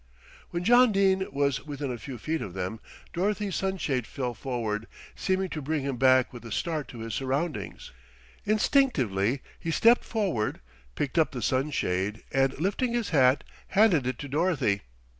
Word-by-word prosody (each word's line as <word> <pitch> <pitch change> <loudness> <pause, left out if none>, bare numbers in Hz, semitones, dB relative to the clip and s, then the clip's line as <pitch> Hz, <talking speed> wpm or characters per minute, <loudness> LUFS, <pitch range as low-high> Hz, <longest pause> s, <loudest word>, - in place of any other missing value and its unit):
When 175 +1 -3
John 245 +3 +6
Dene 190 -1 +2
was 140 -1 0
within 145 -2 -4
a 120 - -4
few 130 +1 -7
feet 160 +7 -2
of 95 -2 -6
them, 95 +4 -3 0.3
Dorothy's 200 +1 -1
sunshade 160 -11 -1
fell 125 -3 -3
forward, 115 -3 -3 0.3
seeming 190 0 0
to 155 - -4
bring 150 0 -1
him 135 -2 -2
back 130 0 +4
with 120 - -9
a 115 - -9
start 155 +1 -2
to 115 -1 -9
his 115 -1 -5
surroundings. 135 +7 -3 0.5
Instinctively 140 - +2 0.2
he 165 - -4
stepped 230 +8 +5
forward, 190 - -1 0.4
picked 145 +3 -1
up 160 - +3
the 125 - -4
sunshade 105 -7 0
and 135 0 +1
lifting 205 +8 0
his 235 -3 -1
hat 130 -3 +4 0.2
handed 190 - +4
it 130 -1 -2
to 145 - -6
Dorothy. 145 - +1
140 Hz, 160 wpm, -27 LUFS, 125-185 Hz, 0.5 s, John